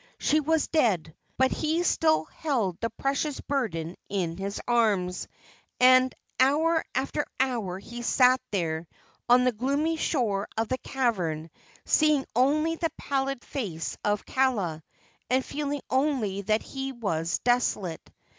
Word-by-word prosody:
She 305 - +2
was 315 +1 +1
dead, 190 - +1 0.2
but 260 0 +3
he 320 +3 0
still 315 -2 +3
held 240 - -2
the 230 - 0
precious 275 +4 -2
burden 180 - -2
in 180 -5 -1
his 195 +2 -4
arms; 205 -7 +1 0.5
and 255 0 +6 0.3
hour 315 +5 +3
after 275 +3 0 0.2
hour 235 -9 0
he 235 +5 -8
sat 255 +1 +4
there 165 -4 -2 0.4
on 250 +1 +6
the 250 - +3
gloomy 280 +8 0
shore 220 -11 0
of 225 0 0
the 255 - -1
cavern, 175 -12 -1 0.3
seeing 300 -3 +3
only 305 +6 +2
the 330 -1 0
pallid 275 -2 -2
face 175 - -4
of 205 -1 0
Kaala, 210 -12 0 0.5
and 260 +1 +2
feeling 290 -1 -3
only 260 -8 0
that 215 +2 +1
he 270 0 -5
was 170 -9 -1
desolate. 235 -8 0
250 Hz, 135 wpm, -27 LUFS, 195-280 Hz, 0.5 s, and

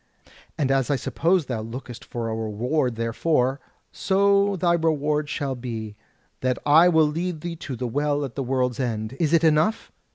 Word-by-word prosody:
And 135 -3 +1
as 135 -1 +1
I 145 - +2
suppose 165 +6 +1
thou 120 -4 -3
lookest 120 +1 -8
for 115 -1 -5
a 110 - -2
reward 120 +5 -1
therefor, 125 +4 0 0.3
so 200 +1 +2
thy 175 -1 +2
reward 150 -2 0
shall 140 -2 -2
be, 115 -4 -6 0.4
that 125 -1 0
I 160 +4 +6
will 160 -2 +4
lead 165 +2 -3
thee 170 0 -4
to 135 -4 -6
the 125 - -4
Well 145 +3 0
at 130 - -8
the 140 - -3
World's 125 -1 -1
End. 110 -3 -2
Is 155 -3 +1
it 165 -1 +4
enough?" 160 +7 +2
140 Hz, 175 wpm, -24 LUFS, 125-160 Hz, 0.4 s, I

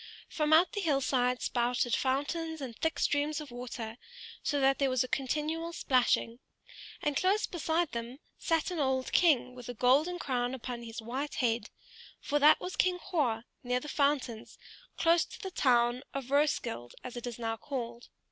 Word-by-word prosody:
From 305 -1 -1
out 325 +4 +6
the 410 - -2
hill 300 -7 +2
side 250 -2 +1
spouted 245 0 +1
fountains 315 +5 -1
in 260 -4 -5
thick 320 +8 -1
streams 295 +1 +1
of 300 -4 -8
water, 240 -2 -6 0.4
so 290 - 0
that 270 0 +3
there 275 -1 +3
was 255 -1 +2
a - - -5
continual 310 +6 -2
splashing; 250 -5 +1 0.6
and 295 -1 0
close 385 +7 +2
beside 335 -1 -1
them 235 +2 -5 0.2
sat 330 +2 0
an 350 - -3
old 265 -2 0
king 285 -7 +3
with 245 -1 -10
a 245 - -5
golden 285 +10 +3
crown 250 -5 -1
upon 245 -1 -6
his 225 -1 -7
white 265 +6 -4
head: 230 -3 0 0.6
that 295 +1 +6
was 365 - -5
King 365 -1 +2
Hroar, 290 -11 -1 0.2
near 250 0 0
the 295 - -9
fountains, 280 -6 -1 0.4
close 335 0 +4
to - - -11
the 385 -3 -6
town 240 -4 +3
of 270 -1 -4
Roeskilde, 280 - 0
as 250 - -7
it 240 0 -5
is 240 - -5
now 225 -1 -2
called. 240 -2 -6
265 Hz, 175 wpm, -31 LUFS, 245-310 Hz, 0.6 s, out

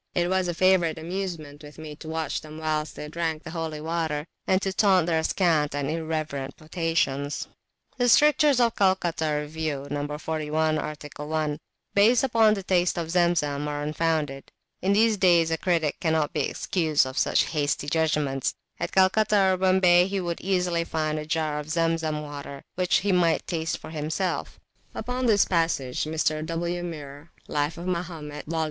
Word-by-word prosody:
It 175 0 +1
was 190 -1 +1
a 175 - -2
favourite 185 -3 +3
amusement 165 -4 -5
with 150 -1 -12
me 155 -1 -8
to 160 - -9
watch 160 0 -2
them 155 0 -10
whilst 155 -1 -2
they 150 - -6
drank 160 0 -3
the 160 - -8
holy 160 -2 -4
water, 160 -2 -2 0.2
and 185 - +3
to 195 - -1
taunt 190 -5 +4
their 160 -2 +1
scant 160 -6 +1
and 145 0 -1
irreverent 155 -4 -3
potations. 155 -3 -1 0.5
The 245 0 +3
strictures 295 0 +5
of 235 -2 +3
the - - -16
Calcutta 170 -6 +1
Review 150 -2 -4
(No. 145 0 -2
41, 155 0 -1
art. 150 0 -5
1), 150 0 -2 0.3
based 225 +5 +5
upon 225 -4 +4
the 195 - -5
taste 180 -2 +1
of 165 -1 -3
Zemzem, 155 -5 +1
are 145 0 -3
unfounded. 150 -3 -1 0.3
In 195 +2 +2
these 220 +1 +4
days 170 -4 +4
a 165 - +1
critic 165 -5 0
cannot 160 -3 0
be 150 - 0
excused 160 -5 +1
for 130 - -5
such - - +1
hasty 145 -2 -1
judgments; 150 -4 0 0.2
at - - -3
Calcutta 195 0 +4
or - - 0
Bombay 185 -1 +4
he 195 0 -2
would 175 -2 -3
easily 180 -3 0
find 155 -2 -2
a 150 - -7
jar 155 -2 -1
of 150 +1 -7
Zemzem 165 -2 0
water, 140 -1 -8
which 180 -1 +2
he 200 +1 +1
might 175 -3 +2
taste 165 -2 -2
for - - -10
himself. 160 +4 -3 0.4
Upon 250 +2 -2
this 205 -3 +5
passage 165 -8 0
Mr. 155 0 0
W. 170 +2 -2
Muir 150 -2 -8 0.2
(Life 145 +2 -1
of 170 - -7
Mahomet, 165 -5 -4
vol. 165 +1 -2
160 Hz, 175 wpm, -26 LUFS, 150-180 Hz, 0.5 s, strictures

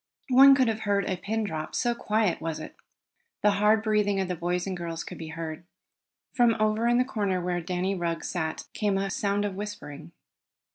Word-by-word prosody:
One 270 +2 +8
could 260 -2 +3
have 220 -1 -1
heard 200 -2 0
a 185 - 0
pin 220 +5 -2
drop, 160 -6 -4
so 240 -1 +1
quiet 215 -5 0
was 165 -1 -3
it. - - -9 0.7
The 210 - +5
hard 215 +1 +4
breathing 210 -2 +1
of 190 - 0
the 180 - -1
boys 175 +1 -1
and 190 -1 -3
girls 170 -2 -5
could - - -9
be 160 - -6
heard. 160 0 -6 0.7
From 240 -2 +4
over 215 +2 +2
in 240 +1 +3
a 250 - +3
corner 205 -8 -1
where 175 0 -2
Danny 180 +3 -1
Rugg 170 -3 -2
sat, 160 -3 -3
came 205 -2 0
a 195 0 -1
sound 200 +1 0
of 205 - -2
whispering. 185 -6 -7
195 Hz, 200 wpm, -27 LUFS, 175-215 Hz, 0.7 s, One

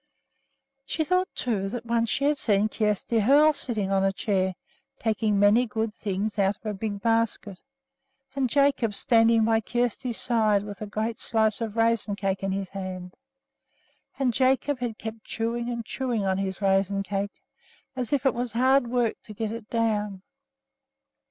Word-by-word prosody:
She 320 - -1
thought, 365 +3 +1
too, 200 -6 -1
that 240 +2 -6
once 230 -1 0
she 280 - -1
had 295 0 +2
seen 210 -1 +2
Kjersti 215 +1 0
Hoel 290 +7 +5
sitting 215 -8 -2
on 195 0 +2
a 195 - +3
chair, 190 -2 -1 0.4
taking 220 -2 0
many 210 +5 +4
good 220 0 -2
things 205 0 -3
out 195 +1 +2
of 215 - -33
a 215 - -2
big 205 0 -5
basket, 225 -4 0 0.7
and 265 -2 0
Jacob 275 -6 +2
standing 225 -1 +4
by 225 0 +3
Kjersti's 240 +1 -2
side 215 -4 +2
with 205 0 -9
a 215 - -4
great 220 +2 -3
slice 220 0 +2
of 225 -2 -3
raisin 225 -2 +2
cake 195 -1 -2
in 195 0 -1
his 195 -1 -3
hand. 185 -2 -6 1.0
And 260 -3 +1
Jacob 265 +2 +1
had 235 -3 -3
kept 220 0 -7
chewing 235 +1 -3
and 235 -2 -4
chewing 240 -6 -2
on 190 0 0
his 195 0 -4
raisin 195 0 +2
cake, 200 0 -4 0.5
as 250 -3 -3
if 280 -3 0
it 265 - +4
was 240 -2 -3
hard 260 +2 +3
work 240 -2 0
to 215 - -11
get 220 0 -3
it 225 -1 -8
down. 210 -4 -1
220 Hz, 170 wpm, -26 LUFS, 200-240 Hz, 1.0 s, Hoel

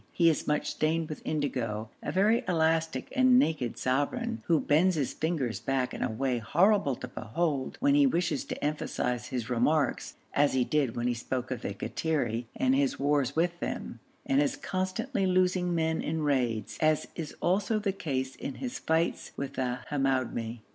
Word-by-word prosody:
He 170 -2 +4
is 155 - -3
much 150 0 0
stained 160 +1 0
with 155 - -6
indigo, 115 -8 -2
a - - -3
very 210 +5 +3
elastic 160 -5 +1
and 255 -1 +6
naked 150 - +1
sovereign, 145 - -1
who 165 -3 +4
bends 165 +6 +3
his 140 -5 -1
fingers 155 -8 -1
back 135 -2 -1
in - - -6
a - - +1
way 125 +2 -1
horrible 170 - +3
to 125 - -7
behold 130 +4 -2
when 280 +1 +4
he 285 -1 +6
wishes 175 - 0
to - - -6
emphasise 125 -5 -1
his 125 -4 -3
remarks, 130 +5 +1 0.2
as 145 0 +3
he 130 -1 +3
did 135 -3 0
when 120 - -2
he 125 - +2
spoke 125 +2 -4
of 125 -3 -3
the 100 - -4
Kattiri 125 -3 -1
and 130 0 +2
his 135 0 +1
wars 140 -1 +1
with 175 +1 +1
them, - - -4 0.3
and 135 +1 +3
his 145 - +1
constantly 195 +3 -2
losing 180 -1 +2
men 160 0 +1
in 160 0 -2
raids, 125 -7 0
as 155 -1 +3
is 160 -3 -6
also 200 +5 +1
the 205 -2 -1
case 135 -8 -3
in 135 - -6
his 125 -1 -5
fights 160 +1 0
with 140 -1 -4
the 125 -1 -2
Hamoumi. 130 -5 -1
145 Hz, 180 wpm, -29 LUFS, 130-170 Hz, 0.3 s, and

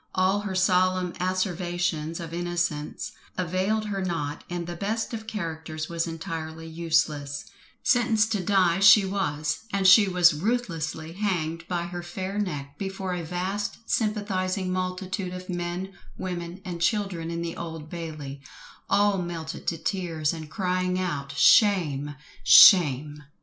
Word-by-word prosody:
All 190 +2 +2
her 205 -2 -4
solemn 185 -1 +2
asseverations 175 -3 -1
of 165 -1 -7
innocence 175 -3 -2 0.3
availed 185 +5 0
her 195 -2 -2
not, 155 -5 -3
and 175 -1 -3
the 175 0 -6
best 215 +6 -2
of 220 -1 -6
characters 160 -6 -5
was 170 0 -1
entirely 160 -1 -6
useless: 160 -3 -1 0.4
sentenced 225 -3 +3
to 205 -4 0
die 185 -2 +3
she 200 +1 +8
was, 155 -6 -1
and 195 -1 +2
she 200 +2 +8
was 180 -2 +5
ruthlessly 165 -5 -2
hanged 165 -4 -2
by 175 -2 -1
her 175 0 -5
fair 185 +3 -4
neck, 145 -8 -4
before 190 -1 -3
a 175 - -3
vast 185 +5 -3
sympathising 195 -4 -1
multitude 185 0 -3
of 185 +1 -9
men, 175 +2 -4 0.2
women, 175 0 -5
and 175 -2 -5
children 185 -4 0
in 170 0 -3
the 165 0 -4
Old 160 -2 -7
Bailey, 155 -4 -7 0.5
all 205 -1 +3
melted 165 -2 -6
to 165 - 0
tears, 165 -3 -1
and 160 -2 -8
crying 185 +1 -1
out 145 -6 -3
"shame," 150 -10 +4 0.3
"shame!" 150 -5 +7
175 Hz, 140 wpm, -26 LUFS, 165-190 Hz, 0.5 s, she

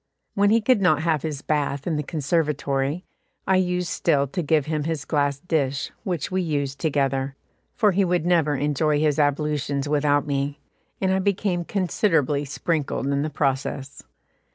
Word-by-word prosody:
When 200 0 +3
he 225 +2 +4
could 225 -1 +3
not 160 -4 +3
have 160 -3 +1
his 150 -2 -4
bath 145 -2 -1
in 170 - 0
the 150 - 0
conservatory, 150 0 -1 0.4
I 190 0 +3
used 180 -1 0
still 145 -2 +2
to 140 +7 -3
give 155 -2 +2
him 155 -1 -2
his 160 -2 -3
glass 145 -2 +1
dish, 140 -4 -1
which 175 -5 -3
we 185 0 +1
used 140 -5 -2
together, 135 -2 0 0.4
for 210 -3 +3
he 195 +2 +2
would 175 -2 0
never 165 -4 +2
enjoy 150 +2 +1
his 150 -1 +1
ablutions 145 -1 0
without 145 -1 +2
me, 140 0 -2 0.4
and 190 -1 +1
I 190 - +2
became 190 -2 0
considerably 165 - +1
sprinkled 150 0 -2
in 140 0 +1
the 155 - -1
process. 135 -1 -2
150 Hz, 165 wpm, -24 LUFS, 140-175 Hz, 0.4 s, he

